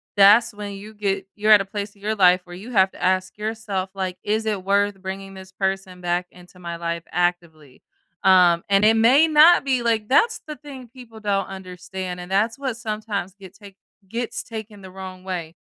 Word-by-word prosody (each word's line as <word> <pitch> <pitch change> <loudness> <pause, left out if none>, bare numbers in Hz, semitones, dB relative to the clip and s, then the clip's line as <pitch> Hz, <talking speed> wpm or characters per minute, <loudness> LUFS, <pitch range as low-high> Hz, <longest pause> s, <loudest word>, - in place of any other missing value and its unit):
that's 210 +3 +6
when 205 -1 -7
you 205 +2 -10
get 195 -2 -2
you're 215 +1 +2
at 210 -2 +8
a - - -4
place 200 +1 -6
in 200 - -23
your 215 +2 -1
life 185 -2 +5
where 175 -1 -10
you 210 +7 -10
have 190 -4 +3
to - - -10
ask 185 +1 0
yourself, 210 -3 -3
like, 185 -2 -4
"Is 220 +2 -1
it 210 -4 -2
worth 200 0 +1
bringing 195 +1 -7
this 190 0 -12
person 190 -1 -3
back 175 0 -1
into 180 0 -17
my 170 -1 -6
life 170 0 -4
actively?" 170 -6 -2 0.4
Um, 180 -3 +5
and 200 0 +3
it 220 +1 +5
may 255 +8 +5
not 315 +2 +6
be, 260 -3 0
like, 225 -2 0
that's 445 - +3
the 305 - -6
thing 275 -4 -11
people 240 -3 -13
don't 200 -2 0
understand, 185 -1 -7
and 180 +1 -9
that's 220 +4 +1
what 265 -4 -3
sometimes 210 -5 -4
get 190 -2 -12
take 200 -1 -15 0.3
gets 235 +1 -3
taken 220 -2 -9
the 190 - -11
wrong 185 -1 -9
way. 175 -3 -5
195 Hz, 205 wpm, -22 LUFS, 185-220 Hz, 0.4 s, at